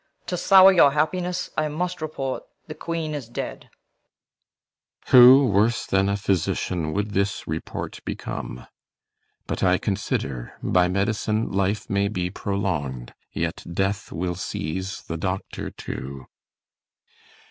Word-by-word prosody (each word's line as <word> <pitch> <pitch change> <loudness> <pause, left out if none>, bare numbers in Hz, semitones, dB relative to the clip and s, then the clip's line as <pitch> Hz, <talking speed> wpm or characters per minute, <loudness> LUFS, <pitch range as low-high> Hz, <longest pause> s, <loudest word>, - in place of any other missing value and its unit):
To 180 - -2
sour 190 +1 +7
your 145 -6 +6
happiness 175 +4 -1
I 155 - +1
must 175 +3 -3
report 135 -4 -3 0.2
The 155 - -7
Queen 160 0 -4
is 135 -6 -5
dead. 120 - -6 1.4
CYMBELINE. - - -16
Who 130 +2 +9
worse 110 +1 +2
than 95 0 +2
a 100 - 0
physician 90 -4 -1
Would 105 +3 -1
this 100 +2 -1
report 80 +1 -5
become? 60 - -6 0.8
But - - -4
I 90 0 +4
consider 80 - -3
By 90 0 +3
med'cine'life 100 0 0
may 100 0 +1
be 90 -3 -2
prolong'd, 80 - -3 0.2
yet - - -3
death 95 +4 -1
Will 90 +1 -2
seize 95 +2 -4
the 85 - -5
doctor 95 +3 -4
too. 65 0 -7
100 Hz, 125 wpm, -24 LUFS, 90-135 Hz, 1.4 s, Who